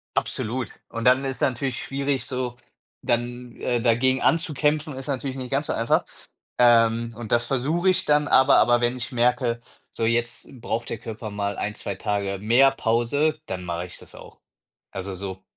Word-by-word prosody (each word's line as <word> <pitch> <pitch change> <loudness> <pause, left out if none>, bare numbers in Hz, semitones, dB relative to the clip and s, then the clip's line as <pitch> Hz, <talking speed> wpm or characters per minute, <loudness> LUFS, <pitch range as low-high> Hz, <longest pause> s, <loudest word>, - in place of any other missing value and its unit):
absolut. 120 +3 -2
Und 115 0 -5
dann 130 +2 +5
ist 135 -1 -3
natürlich 130 0 -1
schwierig, 140 0 -2
so, 125 -2 -3 0.5
dann, 120 0 -2
äh, 120 -1 0
dagegen 125 +3 +2
anzukämpfen 155 -2 +1
ist 135 - -7
natürlich 135 -1 -3
nicht 130 -1 -6
ganz 140 +2 0
so - - 0
einfach. 115 - +2 0.5
Ähm, 115 -1 +4
und 115 -2 -8
das 120 0 +3
versuche 150 +9 +1
ich 185 - +1
dann 150 0 +3
aber 130 +1 +6
aber 120 0 +4
wenn 120 +1 +1
ich 120 - -4
merke: 120 -1 +1 0.3
„So 115 - -2
jetzt 120 +1 -1
braucht 115 0 -3
der 115 - -3
Körper 110 0 -7
mal 100 0 -3
1, 105 +1 -3
2 100 - -4
Tage 100 -1 -2
mehr 120 +6 +5
Pause“, 135 +6 +1
dann 90 -1 -5
mache 85 0 -3
ich - - -10
das - - -15
auch. - - -14 0.5
Also, 95 0 -5
so 95 0 -6
120 Hz, 175 wpm, -24 LUFS, 115-135 Hz, 0.5 s, aber